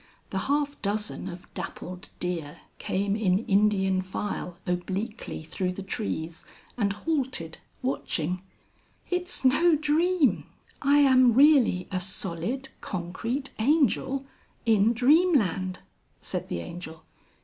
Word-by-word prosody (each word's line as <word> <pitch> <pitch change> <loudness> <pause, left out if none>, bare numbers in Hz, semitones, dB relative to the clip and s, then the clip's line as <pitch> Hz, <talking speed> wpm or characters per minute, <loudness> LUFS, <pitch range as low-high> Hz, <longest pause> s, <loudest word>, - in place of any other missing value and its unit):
The 190 - -1
half 285 0 0
dozen 210 -1 -2
of 175 0 -9
dappled 180 +1 -7
deer 165 -5 -4 0.2
came 200 +1 0
in 200 -1 +1
Indian 195 -2 +3
file 185 -1 -4
obliquely 190 +2 -3
through 180 +3 -2
the 195 - -6
trees 170 -5 -4 0.3
and 205 -4 +1
halted, 250 - -2 0.2
watching. 180 - -1 0.7
"It's 360 -5 -1
no 320 +6 +5
dream 310 +1 +2 0.4
I 285 +1 +4
am 255 -4 +6
really 265 -10 +5
a 185 - 0
solid 190 +8 -2
concrete 220 +9 -3
Angel, 270 0 +2 0.4
in 220 0 +4
Dream 305 +9 +5
Land," 185 -3 -1 0.4
said - - -4
the 85 - -2
Angel. 160 - -8
205 Hz, 115 wpm, -27 LUFS, 180-270 Hz, 0.7 s, am